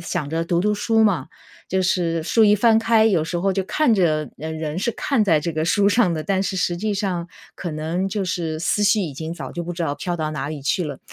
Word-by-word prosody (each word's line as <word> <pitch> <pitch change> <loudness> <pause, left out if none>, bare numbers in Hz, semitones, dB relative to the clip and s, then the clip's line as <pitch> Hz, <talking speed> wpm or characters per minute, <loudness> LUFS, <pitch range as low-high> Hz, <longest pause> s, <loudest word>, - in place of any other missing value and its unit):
想 155 -3 -3
着 165 +2 -1
读 170 0 +1
读 210 +3 +1
书 225 +2 +2
嘛。 180 -11 +1 0.4
就 190 - +1
是 170 -2 0
书 225 +6 +4
一 205 - +5
翻 225 +2 +4
开 225 -1 +4
有 185 -8 +2
时 175 +2 -3
候 195 +2 +1
就 195 0 -1
看 230 +6 +2
着 155 -7 +1
呃， 155 +2 -5
人 155 -1 -4
是 195 +6 0
看 240 0 0
在 165 -7 +3
这 165 +3 -3
个 155 0 -1
书 200 +4 +3
上 205 -5 +3
的， 160 - -2
但 195 -1 0
是 195 0 -2
实 180 -1 0
际 210 +4 -2
上 185 -4 -2 0.3
可 175 - -5
能 160 +5 -2
就 200 0 -2
是 165 -4 -2
思 175 +5 0
绪 205 +1 +4
已 170 -7 -3
经 160 +3 -5
早 140 -6 -7
就 175 - -4
不 175 +1 -5
知 175 - -8
道 145 - -1
飘 175 +4 -3
到 155 -2 -3
哪 145 -2 -4
里 155 -1 -5
去 140 +6 0
了， 145 -5 -5
175 Hz, 280 characters per minute, -22 LUFS, 160-205 Hz, 0.4 s, 一